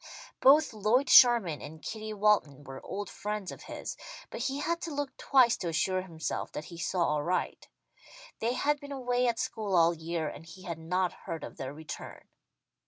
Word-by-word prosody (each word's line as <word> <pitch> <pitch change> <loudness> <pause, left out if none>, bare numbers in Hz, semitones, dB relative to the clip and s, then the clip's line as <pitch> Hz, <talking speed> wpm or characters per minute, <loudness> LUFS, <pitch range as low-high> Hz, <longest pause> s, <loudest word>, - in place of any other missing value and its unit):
Both 290 0 +6
Lloyd 220 +6 +2
Sherman 230 - +7
and 160 +1 -9
Kitty 215 +4 -6
Walton 200 -10 +2
were 135 -1 -9
old 205 +1 -5
friends 210 -2 -4
of - - -10
his, - - -6 0.4
but - - -5
he 265 +2 -1
had 335 +3 -1
to 335 - -4
look 285 -2 -3
twice 255 -4 +4
to 175 - -4
assure 185 +3 +1
himself 165 -4 -4
that 155 - -5
he 170 - -10
saw 170 -4 +1
aright. 170 +5 -2 0.7
They 230 +2 0
had 290 +3 +1
been 285 0 -10
away 250 -2 0
at 235 -1 +1
school 215 -4 -2
all 170 0 +5
year, 165 0 -3
and 150 - -7
he 185 +3 -13
had 170 -4 -5
not 180 +3 0
heard 165 -1 -7
of - - -8
their 130 0 -5
return. 150 +1 -9
195 Hz, 185 wpm, -30 LUFS, 165-245 Hz, 0.7 s, Sherman